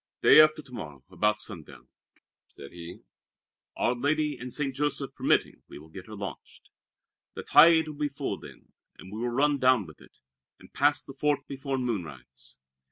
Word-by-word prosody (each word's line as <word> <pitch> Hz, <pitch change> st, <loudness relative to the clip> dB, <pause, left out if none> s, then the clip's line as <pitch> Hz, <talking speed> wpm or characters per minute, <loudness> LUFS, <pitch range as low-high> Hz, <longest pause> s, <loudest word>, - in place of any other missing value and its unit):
"Day -, -, +9 dB
after 155 Hz, 0 st, +3 dB
to 130 Hz, -2 st, -16 dB
morrow, 75 Hz, -, -9 dB
about 105 Hz, 0 st, +1 dB
sundown," 95 Hz, -7 st, -8 dB, 0.6 s
said 70 Hz, -, -13 dB
he, 85 Hz, 0 st, -10 dB, 0.8 s
"our 120 Hz, -, +1 dB
Lady 150 Hz, +4 st, 0 dB
and 125 Hz, 0 st, -8 dB
St. 140 Hz, -2 st, -2 dB
Joseph 145 Hz, -1 st, -2 dB
permitting, -, -, 0 dB
we -, -, -11 dB
will 75 Hz, +2 st, -14 dB
get 95 Hz, +3 st, -10 dB
her 110 Hz, -, -9 dB
launched. 100 Hz, -1 st, -9 dB, 0.6 s
The -, -, -6 dB
tide 160 Hz, +1 st, +6 dB
will 155 Hz, -, -6 dB
be 150 Hz, 0 st, -1 dB
full 140 Hz, 0 st, -4 dB
then, -, -, -15 dB, 0.3 s
and 95 Hz, -, -13 dB
we 110 Hz, -, -6 dB
will 120 Hz, -, -1 dB
run 140 Hz, +3 st, +1 dB
down 130 Hz, -5 st, +3 dB
with 80 Hz, -3 st, -15 dB
it, -, -, -19 dB, 0.4 s
and -, -, -18 dB
pass 145 Hz, +1 st, +2 dB
the 135 Hz, -, -11 dB
fort 145 Hz, +1 st, 0 dB
before 135 Hz, 0 st, -4 dB
moonrise. 90 Hz, -, -6 dB
130 Hz, 175 wpm, -27 LUFS, 100-145 Hz, 0.8 s, Day